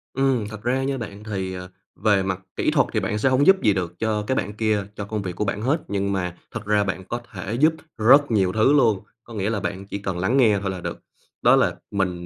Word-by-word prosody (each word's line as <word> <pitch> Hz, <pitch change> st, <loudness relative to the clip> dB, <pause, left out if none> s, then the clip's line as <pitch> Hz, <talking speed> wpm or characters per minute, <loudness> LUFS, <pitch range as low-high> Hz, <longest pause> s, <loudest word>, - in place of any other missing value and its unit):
Ừm, 130 Hz, -5 st, +1 dB
thật 110 Hz, -1 st, -9 dB
ra 130 Hz, +3 st, +1 dB
nha 135 Hz, 0 st, -1 dB
bạn, 105 Hz, -3 st, -7 dB
thì, 95 Hz, -3 st, -3 dB
ờ, 90 Hz, 0 st, -7 dB, 0.3 s
về 100 Hz, -2 st, +2 dB
mặt 95 Hz, -1 st, -2 dB, 0.2 s
kỹ -, -, +1 dB
thuật -, -, +3 dB
thì -, -, +2 dB
bạn 105 Hz, -, -2 dB
sẽ 120 Hz, +5 st, +2 dB
hổng 130 Hz, +4 st, +3 dB
giúp 190 Hz, 0 st, +6 dB
gì 105 Hz, -3 st, +4 dB
được 90 Hz, -2 st, -4 dB
cho 110 Hz, -2 st, 0 dB
cái 130 Hz, -, +1 dB
bạn 105 Hz, +1 st, -2 dB
kia, 105 Hz, -1 st, 0 dB
cho 100 Hz, -, -5 dB
công 105 Hz, 0 st, -3 dB
việc 90 Hz, -2 st, -5 dB
của 105 Hz, -, -1 dB
bản 100 Hz, +2 st, -2 dB
hết, 140 Hz, +7 st, +1 dB
nhưng 100 Hz, 0 st, -1 dB
mà 90 Hz, -2 st, -2 dB
thật 115 Hz, -3 st, -6 dB
ra 105 Hz, 0 st, +3 dB
bạn 95 Hz, -1 st, -3 dB
có 120 Hz, +6 st, -4 dB
thể 95 Hz, +1 st, -5 dB
giúp 155 Hz, +2 st, +5 dB, 0.2 s
rất 135 Hz, +5 st, +5 dB
nhiều 95 Hz, -4 st, +2 dB
thứ 110 Hz, +6 st, +4 dB
luôn, 115 Hz, -9 st, +4 dB, 0.2 s
có 115 Hz, -, -12 dB
nghĩa 105 Hz, 0 st, -1 dB
là 110 Hz, -2 st, -1 dB
bạn 100 Hz, 0 st, -4 dB
chỉ 100 Hz, -, -4 dB
cần 95 Hz, -3 st, -4 dB
lắng 120 Hz, +9 st, +1 dB
nghe 110 Hz, -6 st, +4 dB
thôi 95 Hz, -1 st, -2 dB
là 90 Hz, -2 st, -6 dB
được. -, -, -5 dB, 0.4 s
Đó -, -, +6 dB
là -, -, +2 dB, 0.2 s
mình, 90 Hz, -3 st, -1 dB
105 Hz, 265 wpm, -23 LUFS, 95-115 Hz, 0.4 s, giúp